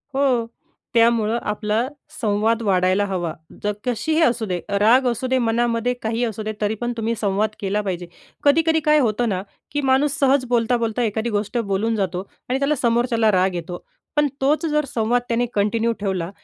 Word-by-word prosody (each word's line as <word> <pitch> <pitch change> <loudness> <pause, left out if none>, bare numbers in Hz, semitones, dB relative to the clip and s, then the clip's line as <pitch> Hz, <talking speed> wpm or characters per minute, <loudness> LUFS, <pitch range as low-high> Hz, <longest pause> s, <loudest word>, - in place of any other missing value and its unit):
हो, 260 -4 +2 0.5
त्यामुळे 230 -1 +3
आपला 210 +3 -1 0.3
संवाद 220 +2 +1
वाढायला 190 0 +2
हवा. 175 -4 -2 0.3
जर 210 - +1
कशीही 310 +7 0
असू 235 -6 +2
दे, 180 -3 -2 0.2
राग 245 +5 +5
असू 245 +2 -1
दे 260 0 +2
मनामध्ये 235 +1 +1
काहीही 225 +2 -1
असू 220 -2 -4
दे, 215 - -3
तरीपण 220 +3 -1
तुम्ही 225 +1 -1
संवाद 205 +1 +1
केला 205 +1 -1
पाहिजे. 180 -3 -4 0.4
कधी-कधी 320 +2 +4
काय 300 0 +6
होतं 235 -1 +1
ना 185 -2 -1 0.3
की 290 - -1
माणूस 280 +2 +2
सहज 270 -1 +3
बोलता-बोलता 235 0 +1
एखादी 220 +1 -1
गोष्ट 210 +4 -3
बोलून 220 +1 0
जातो 190 -2 -2 0.3
आणि 260 +2 0
त्याला 280 +2 +1
समोरच्याला 235 -2 +2
राग 185 0 +2
येतो. 175 +1 -6 0.3
पण 295 0 +3
तोच 295 +5 +2
जर 300 -2 +1
संवाद 235 +2 +1
त्याने 240 +1 +1
कंटिन्यू 220 +3 +1
ठेवला, 190 -4 -2
230 Hz, 170 wpm, -22 LUFS, 205-245 Hz, 0.5 s, काय